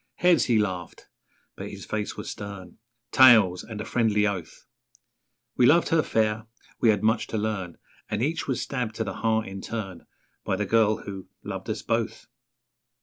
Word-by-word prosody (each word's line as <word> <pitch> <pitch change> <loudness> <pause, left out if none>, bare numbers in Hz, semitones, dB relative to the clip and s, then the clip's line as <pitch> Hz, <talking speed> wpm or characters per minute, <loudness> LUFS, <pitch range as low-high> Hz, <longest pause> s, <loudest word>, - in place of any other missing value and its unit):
'Heads!' 175 -2 +4
he 120 -3 +3
laughed 95 -5 -3 0.5
(but - - -7
his - - -9
face 105 -1 -3
was - - -6
stern) 100 -3 -8 0.3
'Tails!' 110 -9 +6
and 110 -2 -8
a 105 - -4
friendly 110 -3 +2
oath; 95 -6 -4 0.9
We 125 - +5
loved 170 +5 +4
her 165 -1 +4
fair, 110 -3 0 0.3
we 115 - +4
had 105 -1 +2
much 110 +1 +2
to 110 - -3
learn 105 -5 -3 0.3
And 105 +2 -1
each 160 +4 -1
was 130 -3 -1
stabbed 125 -5 -3
to - - -1
the - - -5
heart 110 -1 +1
in 95 0 -7
turn 95 -6 -6 0.4
By - - 0
the 105 +2 -1
girl 110 +1 +2
who 95 -2 -8 0.2
loved 95 0 -6
us 110 - -3
both. 115 -1 -2
110 Hz, 175 wpm, -26 LUFS, 100-115 Hz, 0.9 s, Tails